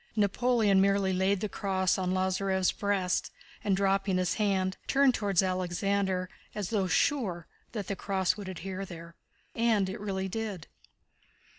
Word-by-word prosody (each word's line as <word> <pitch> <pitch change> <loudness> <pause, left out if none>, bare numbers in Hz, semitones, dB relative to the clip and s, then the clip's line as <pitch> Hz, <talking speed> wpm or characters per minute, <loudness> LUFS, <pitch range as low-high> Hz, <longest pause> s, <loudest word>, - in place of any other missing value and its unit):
Napoleon 210 -1 +3
merely 195 -1 +2
laid 190 +1 +1
the 215 - 0
cross 190 -2 0
on 185 -1 -1
Lázarev's 190 0 +1
breast 195 -3 0 0.3
and, 195 -2 +2
dropping 195 -1 +1
his 180 -1 +1
hand, 190 -3 0
turned 275 -1 +4
toward 200 -6 0
Alexander 185 +1 0 0.3
as 205 -2 -3
though 200 -4 +1
sure 180 - +1 0.3
that 210 -4 -3
the 200 - -3
cross 190 -1 0
would 200 -3 -7
adhere 185 +2 -5
there. 170 -2 -9 0.4
And 225 -4 +2
it 190 - -6
really 190 -2 -2
did. 200 -5 -4
195 Hz, 145 wpm, -29 LUFS, 185-205 Hz, 0.4 s, turned